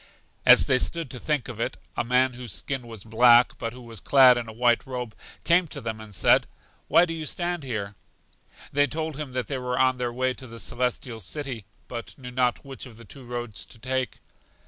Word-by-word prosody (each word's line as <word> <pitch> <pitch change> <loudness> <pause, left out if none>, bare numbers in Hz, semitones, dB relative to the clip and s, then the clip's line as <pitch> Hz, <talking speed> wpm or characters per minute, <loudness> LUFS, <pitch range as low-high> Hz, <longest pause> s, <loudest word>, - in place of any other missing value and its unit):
As - - +9
they 130 - +3
stood 165 -4 -1
to 125 - -6
think 150 -2 -1
of 120 -3 -8
it, - - -2 0.2
a - - 0
man 125 +2 +3
whose 120 -4 -5
skin 135 -4 -3
was 110 -4 -9
black, 120 +2 +5
but 115 - -3
who 125 +1 -12
was 115 -3 -9
clad 130 +1 +7
in 120 -1 -3
a - - -6
white 120 +1 +2
robe, 125 -4 -5 0.3
came 170 +1 +4
to - - -7
them 110 -1 -5
and 105 -2 -11
said: - - +4 0.4
Why 175 - +6
do 165 - -4
you 160 -2 -5
stand 175 -1 -2
here? 105 -6 -4 0.8
They 145 0 +4
told 160 0 -4
him 145 -3 -6
that 125 -1 -1
they 135 -2 -3
were 125 0 -2
on 130 -1 +3
their 120 -1 -1
way 130 +1 0
to 130 0 -10
The 115 0 -10
Celestial 125 -1 -2
City, 120 - -5 0.2
but 120 -1 -7
knew 125 -2 -9
not 125 0 0
which 135 -1 -7
of 115 -3 -14
the 115 - -13
two 135 +3 -11
roads 120 -7 -4
to - - -15
take. 130 +1 -2
125 Hz, 220 wpm, -26 LUFS, 115-135 Hz, 0.8 s, As